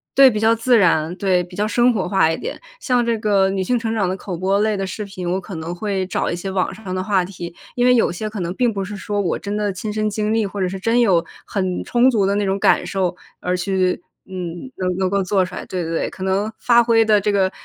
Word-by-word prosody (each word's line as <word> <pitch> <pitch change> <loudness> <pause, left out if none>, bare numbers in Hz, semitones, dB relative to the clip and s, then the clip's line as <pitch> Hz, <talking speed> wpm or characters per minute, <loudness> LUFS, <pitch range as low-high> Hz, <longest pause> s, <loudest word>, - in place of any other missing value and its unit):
对， 270 -1 +8
比 215 - -2
较 225 +1 +4
自 235 +2 +3
然， 165 -4 +3
对， 185 -3 +2
比 175 - -14
较 210 - +1
生 240 +2 +3
活 190 -5 -1
化 180 -4 +3
一 160 - -2
点。 - - -6 0.2
像 250 - +1
这 235 -1 +1
个 200 -3 +2
女 195 -1 -1
性 245 +7 +1
成 225 -1 -2
长 205 -5 +1
的 185 - -1
口 185 -2 -6
播 195 +3 +1
类 215 -1 +1
的 195 -1 -2
视 210 - -5
频， 190 -3 -5
我 185 +2 -1
可 190 0 -8
能 165 +2 -5
会 190 -1 -2
找 - - -1
一 - - -1
些 190 +2 -5
网 190 0 -1
上 190 -2 -6
的 185 - -2
话 190 -2 +1
题， 175 -2 -8 0.2
因 245 0 +2
为 250 - +6
有 235 - +3
些 215 +5 -4
可 210 -1 -6
能 175 -1 -2
并 245 0 +2
不 195 -1 -3
是 205 +2 -7
说 205 +1 -3
我 190 - 0
真 205 +1 -4
的 205 -2 -1
亲 210 +3 -4
身 215 0 0
经 210 +1 -1
历， 225 -2 +2
或 200 0 -5
者 180 - +1
是 195 - -5
真 230 +5 +2
有 185 -8 +3 0.2
很 185 -3 -2
充 245 +2 +3
足 215 -6 +2
的 200 +1 +1
那 205 -1 0
种 195 +1 0
感 - - +3
受， 185 -2 -1 0.2
而 180 0 -1
去 185 -1 0 0.3
嗯， 180 +4 -6
能 180 -1 -1
能 185 -1 +1
够 200 0 +1
做 190 0 +2
出 185 0 -6
来， - - -6
对， 180 -1 -4
对， 165 - -4
对。 165 - -1
可 - - -12
能 195 +3 0
发 235 -1 +5
挥 225 -1 +4
的 215 -2 +4
这 205 +1 0
个， 190 -2 +2
195 Hz, 300 characters per minute, -20 LUFS, 185-215 Hz, 0.3 s, 对